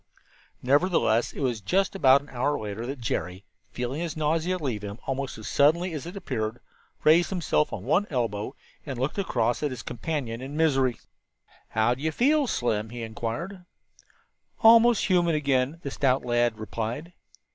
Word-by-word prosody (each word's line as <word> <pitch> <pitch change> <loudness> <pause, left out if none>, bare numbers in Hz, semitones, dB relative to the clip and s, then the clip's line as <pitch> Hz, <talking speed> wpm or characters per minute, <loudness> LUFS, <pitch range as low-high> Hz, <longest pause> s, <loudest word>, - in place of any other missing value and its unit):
Nevertheless, 140 -4 +2
it - - -7
was 120 -5 -1
just 190 - +1
about 140 -7 +5
an 145 - -16
hour 130 +4 0
later 110 +2 -5
that 135 -1 -5
Jerry, 95 -3 -3 0.2
feeling 125 +5 -4
his 165 -2 -4
nausea 160 +4 0
leave 130 - -3
him 100 0 -6
almost 135 0 -3
as 110 - -8
suddenly 165 +5 +3
as 155 +1 -5
it - - -4
had 180 - -11
appeared, 110 - -3 0.4
raised 165 +3 +5
himself 170 -5 0
on 95 - -5
one 180 - +2
elbow 115 -2 -2 0.3
and 135 -5 -6
looked 135 +10 -2
across 120 - 0
at 150 - 0
his 130 -4 -7
companion 125 -1 -4
in 140 +3 -6
misery. 135 -7 +2 0.7
"How 110 +2 +2
do 130 - -9
you 160 +1 0
feel, 285 - +2
Slim?" 110 - -1
he 120 0 -6
inquired. 115 - -5 1.0
"Almost 230 0 +7
human 175 -3 +3
again," 140 +1 0
the 140 - -4
stout 130 -2 +1
lad 120 -2 +1
replied. 115 +9 -5
135 Hz, 170 wpm, -26 LUFS, 115-165 Hz, 1.0 s, Almost